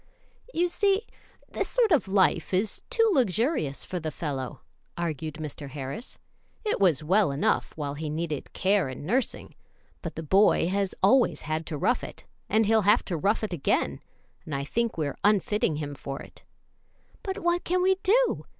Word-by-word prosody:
"You 350 -3 +1
see, 400 +4 +1 0.4
this - - -2
sort 470 -4 +2
of 295 - +3
life 190 -2 +2
is 200 +3 0
too 455 -1 +3
luxurious 225 - +1
for 180 - -4
the 160 -1 -3
fellow," 140 -5 -5 0.4
argued 160 -2 -3
Mr. 150 -2 -6
Harris. 140 - -6 0.5
"It 425 - 0
was 170 -7 +3
well 190 +4 +3
enough 140 +2 0
while 145 -2 -3
he 150 +1 -4
needed 155 -2 -3
care 190 -6 +2
and 130 +2 -7
nursing, 250 +8 -1 0.5
but - - -6
the 160 - -5
boy 190 +1 +4
has 195 0 -1
always 245 +6 +4
had 155 +1 -3
to 155 - -3
rough 245 - +1
it, - - -9 0.2
and 220 0 +3
he'll 220 +1 +4
have 210 +3 +4
to 180 - -2
rough 200 +8 +1
it 210 - -2
again; 160 - 0 0.4
and 150 - -5
I 140 - -2
think 230 +9 -1
we're 150 -3 -2
unfitting 210 -4 +2
him 145 -1 -4
for 135 -1 -6
it." - - -14 0.8
"But 385 0 -4
what 345 -3 0
can 360 +1 +1
we 380 0 +3
do? 485 +6 +2
190 Hz, 175 wpm, -27 LUFS, 150-240 Hz, 0.8 s, boy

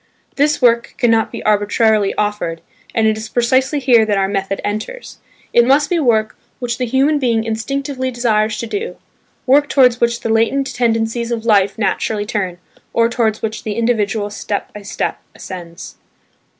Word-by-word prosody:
This 290 -1 +1
work 235 -1 +3
cannot 225 -2 +2
be - - -7
arbitrarily 210 0 +2
offered, 205 -6 -2 0.3
and 225 -2 +2
it 220 0 +2
is 220 0 -7
precisely 260 +4 +1
here 245 -4 +4
that 210 -2 0
our 195 0 +1
method 195 0 -2
enters; 215 - -5 0.3
it 240 - +6
must 280 +5 +3
be 350 - +2
work 220 -6 +1 0.2
which 245 -1 -4
the 250 - -1
human 275 +5 +2
being 230 -4 +1
instinctively 260 +4 -3
desires 225 -3 0
to - - -4
do, 410 - -4 0.5
work 285 +3 +4
towards 250 -3 +4
which 235 0 +1
the - - -3
latent 230 +5 +1
tendencies 230 0 0
of 230 -1 -3
life 200 -3 +3
naturally 210 0 -1
turn, 190 -4 -3 0.4
or 230 0 +3
towards 225 -3 -1
which 220 0 -3
the 215 - -4
individual 220 -3 0
step 205 0 -4
by 210 - -8
step 200 - -3 0.2
ascends. 170 -3 -9
225 Hz, 165 wpm, -17 LUFS, 210-250 Hz, 0.5 s, it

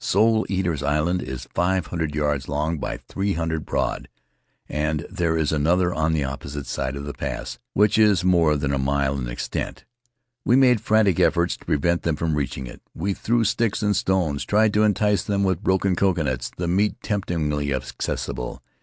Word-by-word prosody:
Soul 110 +2 +3
Eaters' 90 -6 -1
Island 75 +5 +1
is 65 0 -6
five 90 0 +1
hundred 80 -1 -3
yards 75 -2 -1
long 75 +2 -1
by - - -3
three 100 +1 -3
hundred 80 -1 -2
broad, - - -2 0.6
and 75 +1 -1
there 85 -2 0
is 80 -2 +1
another, 90 +4 +2
on 80 +1 +1
the 75 -3 +1
opposite 70 +1 -5
side 65 +1 -3
of 70 0 -6
the 70 - -5
pass, - - -5 0.2
which 105 +2 +4
is 105 -5 +4
more 85 -4 +4
than 70 -1 -1
a 70 - 0
mile 70 0 +1
in 60 - -3
extent. - - -4 0.6
We 120 - +3
made 125 -4 +5
frantic 110 -5 +3
efforts 85 +1 +2
to - - -18
prevent 85 +4 +1
them 85 -2 0
from 80 0 -1
reaching 70 -3 -2
it. - - -11
We 95 +5 -1
threw 115 +4 +1
sticks 115 0 0
and 105 -1 +2
stones, 85 -7 0
tried 105 +3 +3
to 105 - +3
entice 105 -1 +2
them 100 -1 -1
with 95 -4 0
broken 95 0 +1
coconuts, 75 -11 0
the 85 - -2
meat 100 +5 +2
temptingly 75 -8 -1
accessible. 65 -2 -4
85 Hz, 180 wpm, -23 LUFS, 75-100 Hz, 0.6 s, made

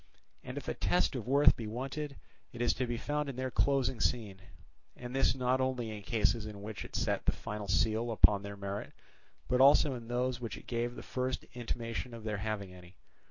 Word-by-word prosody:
And 125 +2 -7
if 145 - -6
a - - 0
test 180 -2 +2
of 120 -3 -4
worth 140 +2 +6
be 115 - -5
wanted, 135 +5 -4 0.4
it 120 - -10
is 120 - +3
to 125 - -2
be 120 0 -2
found 150 +3 -1
in 135 - -5
their 130 0 -2
closing 135 -3 +2
scene, 105 -6 0 0.5
and 125 +1 -7
this 135 -1 +3
not 130 0 +1
only 125 -4 -1
in 105 - -7
cases 110 0 +1
in 100 -2 -8
which 105 0 -5
it - - -10
set - - 0
the - - +6
final 105 -1 -6
seal 110 +7 +2
upon 105 -3 +5
their 100 0 -7
merit, 100 0 -5 0.5
but 125 0 +3
also 140 +1 +7
in 120 -2 -7
those 125 +1 0
in - - -18
which 115 - -4
it - - -13
gave 120 0 -2
the - - -8
first 130 0 -2
intimation 120 0 -4
of 115 - -9
their 105 -1 -2
having 100 -2 -3
any. 90 0 -14
120 Hz, 215 wpm, -33 LUFS, 105-130 Hz, 0.5 s, also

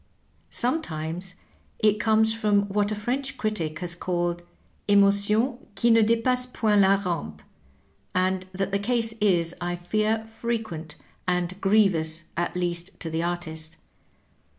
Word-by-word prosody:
Sometimes 180 - -2 0.4
it 210 -1 +3
comes 220 +1 +3
from 210 -2 +2
■what 205 +1 +1
a - - 0
French 265 +6 -2
critic 215 -10 -2
has 175 -1 -2
called 175 0 -2
^^ - - -25 0.4
emotions 205 +5 +3 0.2
qui 235 - +4
ne 225 0 +6
dS 225 +1 +2
passent 250 0 +1
point 210 -2 +3
la 195 0 +5
rampei^ 170 - -4 0.8
and 185 0 +1
that 195 +1 -2
the 200 - +1
case 225 +1 +1
is, 175 -5 +3
I 175 0 -1
fear, 215 +5 0
fre 225 +1 -3
quent, 165 -9 -5 0.3
and 180 0 0
grievous 175 -6 +3
at 175 +1 -2
least 175 -1 -2
to 165 - -4
the 160 +1 -1
artist. 165 -2 -4
200 Hz, 145 wpm, -26 LUFS, 175-220 Hz, 0.8 s, ne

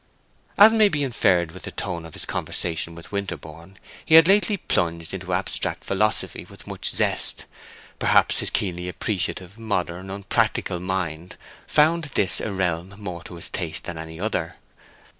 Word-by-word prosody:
As 215 +2 +9
may 215 -2 +5
be 150 -5 -1
inferred 95 -10 +2
from 95 - -10
the - - -6
tone 85 -2 -4
of 80 - -13
his - - -4
conversation 85 0 -3
with 85 +2 -12
Winterborne, 95 -3 -6 0.3
he 160 - +4
had 165 0 +9
lately 205 +1 +4
plunged 85 - -1
into - - -5
abstract - - -1
philosophy 105 +2 0
with - - -14
much - - -2
zest; - - +2 0.5
perhaps - - +4
his - - 0
keenly 90 -2 -2
appreciative, 95 +1 -2
modern, 95 -4 -3
unpractical 95 -2 0
mind 90 -2 -4 0.3
found 160 +2 +3
this 95 - +3
a 110 - -3
realm 90 0 -2
more 90 -5 -6
to 85 - -9
his 85 - -7
taste - - -3
than 85 -2 -6
any 80 0 -8
other. 110 +3 -2
95 Hz, 160 wpm, -24 LUFS, 85-110 Hz, 0.5 s, As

